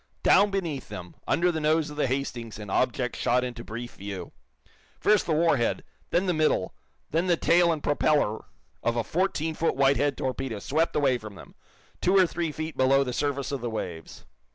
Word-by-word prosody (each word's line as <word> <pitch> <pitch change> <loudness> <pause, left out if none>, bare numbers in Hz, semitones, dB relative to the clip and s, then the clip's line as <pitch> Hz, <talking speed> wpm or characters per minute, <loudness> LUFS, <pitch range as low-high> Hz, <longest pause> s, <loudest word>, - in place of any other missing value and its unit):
Down 205 +1 +5
beneath 175 -8 -3
them, 90 -1 -8
under 180 +1 +2
the 160 - -2
nose 155 0 +1
of - - -8
the 145 -2 +1
"Hastings" 120 -4 -3
an 105 -2 -7
object 125 +1 0
shot 125 +1 +1
into 120 -2 -5
brief 120 +2 -7
view. 95 -2 -6 0.7
First 210 -1 +3
the - - 0
war 160 -1 +3
head, 120 - -1 0.3
then 180 +3 +1
the 180 - +1
middle, 155 - +1 0.4
then 165 +4 +1
the 175 -2 +3
tail 170 +1 +4
and 155 -3 -3
propeller 145 -6 +1 0.4
of 115 - 0
a 120 - 0
fourteen 160 - -1
foot 165 +1 0
Whitehead 140 +1 +2
torpedo 130 -3 -3
swept 155 +10 0
away 135 -4 +2
from 110 -2 -10
them, 90 - -13 0.5
two 190 +2 +3
or 190 - +7
three 170 -2 -2
feet 155 0 -5
below 135 +1 +4
the 125 -2 -4
surface 140 0 -1
of 140 -3 -3
the 120 - -2
waves. 85 -7 -6
140 Hz, 195 wpm, -27 LUFS, 120-165 Hz, 0.7 s, or